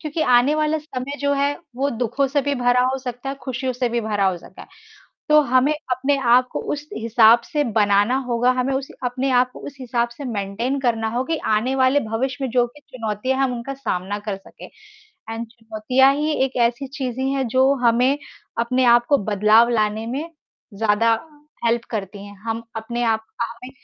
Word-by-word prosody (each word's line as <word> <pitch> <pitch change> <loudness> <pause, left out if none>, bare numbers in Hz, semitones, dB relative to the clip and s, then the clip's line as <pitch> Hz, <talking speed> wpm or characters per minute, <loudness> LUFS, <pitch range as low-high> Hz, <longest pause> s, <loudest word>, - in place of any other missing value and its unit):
क्योंकि 310 0 -2
आने 250 +3 +4
वाला 310 0 +1
समय 280 -2 -6
जो 285 0 +1
है, 280 +1 0 0.2
वो 275 +2 0
दुखों 245 +4 0
से 285 +2 +1
भी 285 +1 0
भरा 245 0 +2
हो 265 - -2
सकता 250 0 -6
है, 275 - -2
खुशियों 255 0 -3
से 250 0 -1
भी 235 0 -1
भरा 210 -3 0
हो 185 - -2
सकता - - -13
है। - - -15 0.6
तो 300 0 +7
हमें 260 +1 +3 0.2
अपने 270 +3 +1
आप 250 0 +4
को - - -2
उस 295 +1 -6
हिसाब 230 +1 +5
से 295 -1 +1
बनाना 210 0 +2
होगा, 245 +1 +2
हमें 255 +1 -1
उस 270 +1 -3 0.2
अपने 255 +2 -1
आप 250 0 +3
को - - -11
उस 285 - -9
हिसाब 240 -1 -1
से 285 - -7
मेंटेन 230 +3 -2
करना 225 -3 0
हो, 240 +3 -1
कि 325 +4 -1
आने 220 +5 +1
वाले 265 +2 +3
भविष्य 260 +4 -2
में 260 - -2
जो 245 0 +3
भी 270 +5 -17
चुनौतियाँ 255 -1 -3
है, - - +2
हम 255 - -1
उनका 240 +4 -5
सामना 205 -6 -3
कर 195 - -1
सकें। 195 - -14 0.6
एंड 225 +1 -4
चुनौतियाँ 230 +3 +1
ही 300 +2 -1
एक 265 -1 -5
ऐसी 240 +3 +1
चीज़ें 260 -2 -4
हैं, 270 -1 0
जो 260 +3 +3
हमें 250 +4 +3 0.4
अपने 250 +2 +1
आप 240 0 +5
को 285 - +4
बदलाव 215 +3 +4
लाने 215 -1 0
में 280 +7 -4 0.5
ज़्यादा 220 +2 +2 0.5
हेल्प 235 0 +1
करती 200 -2 -5
हैं, 205 - -12
हम 225 0 -3
अपने 235 +2 -3
आप 220 -1 +1 0.2
अ, - - +2
हमें 240 +3 -9
245 Hz, 200 wpm, -21 LUFS, 225-270 Hz, 0.6 s, तो